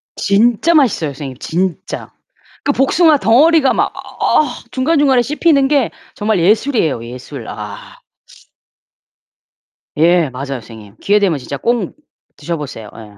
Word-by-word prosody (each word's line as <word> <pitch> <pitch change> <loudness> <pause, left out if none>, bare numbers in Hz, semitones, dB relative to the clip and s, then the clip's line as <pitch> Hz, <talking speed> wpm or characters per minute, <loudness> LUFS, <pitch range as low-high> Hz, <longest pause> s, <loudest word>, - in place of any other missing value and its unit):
진짜 230 +10 +2
맛있어요 235 - +2
선생님 135 -2 -8
진짜. 180 +1 -3 0.5
그 285 - +1
복숭아 300 +4 +3
덩어리가 275 +5 +4
막 - - 0 0.3
어 305 - +3 0.3
중간중간에 270 -2 +2
씹히는 285 +1 +2
게 280 -4 +1 0.2
정말 210 -2 0
예술이에요 190 - +1
예술. 125 0 -9
아. 105 -1 -9 2.0
예 165 -1 +3
맞아요 130 +2 -6
선생님. 110 -2 -13
기회 205 +1 +2
되면 185 -7 +1
진짜 140 +1 -6
꼭 235 - -1 0.4
드셔보세요. 145 -8 -6
예. 105 -3 -13
200 Hz, 275 characters per minute, -16 LUFS, -, 2.0 s, 덩어리가